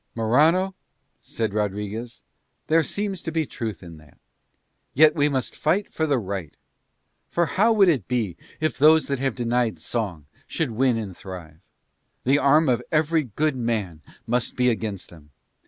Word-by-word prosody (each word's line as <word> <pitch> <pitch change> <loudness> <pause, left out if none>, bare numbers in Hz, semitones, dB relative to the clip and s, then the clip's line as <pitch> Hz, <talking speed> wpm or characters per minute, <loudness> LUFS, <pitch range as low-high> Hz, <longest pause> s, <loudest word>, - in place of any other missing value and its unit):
"Morano," 155 +12 +3 0.5
said 110 -3 -3
Rodriguez, 105 +3 -3 0.4
"there 165 +1 +4
seems 195 +2 -3
to 165 - -4
be 160 -1 0
truth 110 -8 -6
in 85 -2 -11
that. 75 -3 -19 0.8
Yet 155 +3 +6
must 145 -6 0
we - - -16
fight 190 +7 0
for 160 - 0
the 140 -3 +2
right. 95 -7 -5 0.7
For 170 - +1
how 200 +9 +2
would 200 -3 +5
it 140 - +1
be 115 -8 -1 0.2
if 155 -1 -1
those 155 +2 +6
that 140 -2 -1
have 135 -3 -1
denied 120 -4 0
song 90 - -4 0.2
should 160 -7 -2
win 125 +1 +2
and 100 -5 -5
thrive? 85 -5 -10 0.6
The 135 +3 +3
arm 150 +3 +4
of 125 -2 +2
every 155 0 +2
good 145 +6 -1
man 110 -10 -2 0.2
must 120 0 -1
be 125 -1 +3
against 110 -4 -4
them. 80 -4 -16
125 Hz, 160 wpm, -24 LUFS, 105-155 Hz, 0.8 s, Yet